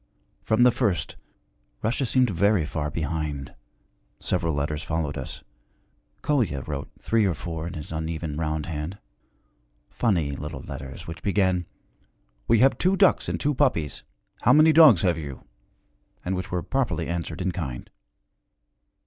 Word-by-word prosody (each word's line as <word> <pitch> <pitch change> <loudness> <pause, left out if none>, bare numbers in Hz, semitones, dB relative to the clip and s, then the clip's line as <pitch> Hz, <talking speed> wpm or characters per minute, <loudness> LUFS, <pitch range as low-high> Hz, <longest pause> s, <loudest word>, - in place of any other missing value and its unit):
From 110 +2 +3
the 125 - +7
first 110 -8 -1 0.7
Russia 120 +4 0
seemed 125 -2 +3
very 100 -1 +2
far 75 -1 -3
behind. 75 -2 -3 0.7
Several 85 -3 0
letters 75 +1 -2
followed 80 -2 -2
us. - - -6 0.8
Kolya 115 - +1
wrote 70 +1 -5
three 115 -1 +2
or 95 -5 +1
four 80 +2 -5
in - - -6
his 75 0 -6
uneven 80 -1 -3
round 80 -1 -2
hand 80 +3 -5 0.9
funny 85 -11 +1
little 75 +2 -6
letters 65 -2 -8
which 80 0 -8
began, 95 -3 +1 0.8
'We 115 - +4
have 135 +1 +4
two 185 +2 +3
ducks 195 -1 +3
and - - -2
two 145 +1 +1
puppies. 105 - 0 0.4
How 125 - +5
many 155 +2 +6
dogs 150 - +8
have 85 -3 +2
you?' 70 -4 -7 0.8
and 95 +1 0
which 95 - -4
were 90 -1 -2
properly 130 - -1
answered 85 -1 -3
in 95 0 0
kind. 70 -9 -5
85 Hz, 145 wpm, -25 LUFS, 75-110 Hz, 0.9 s, dogs